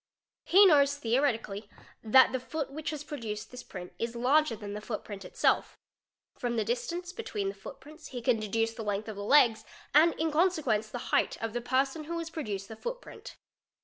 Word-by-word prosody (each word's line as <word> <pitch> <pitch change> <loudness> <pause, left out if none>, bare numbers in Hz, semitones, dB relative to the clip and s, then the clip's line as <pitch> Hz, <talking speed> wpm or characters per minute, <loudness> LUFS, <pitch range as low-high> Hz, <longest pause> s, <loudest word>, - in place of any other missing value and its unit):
He 395 +3 +7
knows 285 -5 +5
theoretically 225 -5 0 0.3
that 255 +4 +6
the 260 - -1
foot 280 +2 -4
which 310 +2 -4
has 300 -2 -5
produced 225 -8 -6
this 250 0 -8
print 180 -6 -9
is 230 +1 -3
larger 260 +2 +3
than 205 -1 -7
the 210 - -5
footprint 210 -2 -6
itself, - - +1 0.6
from 240 -1 -3
the 220 -2 0
distance 340 - -3
between 210 - -3
the - - -5
footprints 285 - -11
he 250 - -6
can 240 -1 +2
deduce 225 +2 -1
the 230 - -7
length 205 0 -2
of 220 - -6
the 200 - -6
legs, 235 -2 +5 0.3
and 320 +4 +6
in 320 0 -1
consequence 300 - +1
the 245 - -6
height, - - +2
of 225 -1 -3
the 240 - -2
person 270 +5 0
who 335 +2 -4
has 330 0 -5
produced 205 -12 -4
the 220 - -8
footprint. - - -8
245 Hz, 190 wpm, -30 LUFS, 220-300 Hz, 0.6 s, He